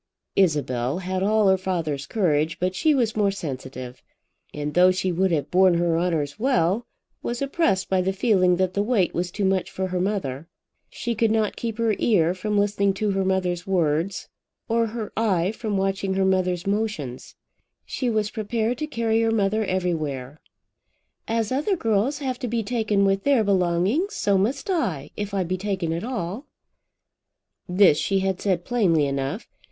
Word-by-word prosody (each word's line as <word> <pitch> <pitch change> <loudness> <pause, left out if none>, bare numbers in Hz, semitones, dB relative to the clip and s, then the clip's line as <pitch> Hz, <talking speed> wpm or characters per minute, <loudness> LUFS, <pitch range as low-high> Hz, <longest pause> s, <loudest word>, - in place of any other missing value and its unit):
Isabel 145 -7 +1
had 185 0 -3
all 210 +1 +3
her 190 0 +4
father's 160 -7 -2
courage, 160 -6 +1
but 185 +1 0
she 300 +11 +2
was 235 -4 +1
more 205 -2 +2
sensitive; 130 -8 -6 0.5
and 150 0 -4
though 180 +2 +6
she 185 0 0
would 190 +2 +1
have 150 -4 -1
borne 185 -1 +5
her 170 -1 +1
honours 165 -2 -1
well, 220 -2 +1 0.3
was 240 0 -3
oppressed 275 - 0
by 190 -1 +2
the 190 +1 0
feeling 190 -3 +3
that 185 0 0
the 200 - +1
weight 205 -4 +1
was 175 +1 -1
too 200 +2 -2
much 190 -1 +1
for 190 0 -3
her 180 0 -1
mother. 165 -8 -2 0.4
She 235 +3 -3
could 225 0 +2
not 215 -1 +1
keep 230 -2 -4
her 230 -2 +1
ear 175 -7 +3
from 205 +3 -2
listening 200 -1 +1
to 210 +1 0
her 195 0 0
mother's 185 -1 -1
words, 170 0 0 0.4
or 230 -1 +1
her 220 -1 -6
eye 195 -5 +1
from 215 -2 -3
watching 195 0 -1
her 190 0 +2
mother's 185 -1 +1
motions. 200 - -3 0.5
She 255 - -2
was 215 -1 0
prepared 225 +2 -2
to 305 - -2
carry 230 -5 0
her 225 - +2
mother 215 0 +1
everywhere. 155 -8 -2 0.9
"As 225 0 -1
other 300 +10 +1
girls 225 - 0
have 260 -3 -3
to 250 - -3
be 230 0 -1
taken 215 -3 +1
with 195 0 +1
their 275 -5 +3
belongings, 195 - +1
so 200 - +1
must 250 +8 -1
I, 195 - -1
if 205 0 -4
I 190 - +1
be 185 +2 -2
taken 190 -4 -2
at 170 - -3
all." 230 - -4 1.2
This 180 -4 +5
she 195 -1 +1
had 190 -1 -1
said 185 -4 0
plainly 180 -11 +2
enough. 140 - -3
195 Hz, 175 wpm, -24 LUFS, 175-220 Hz, 1.2 s, though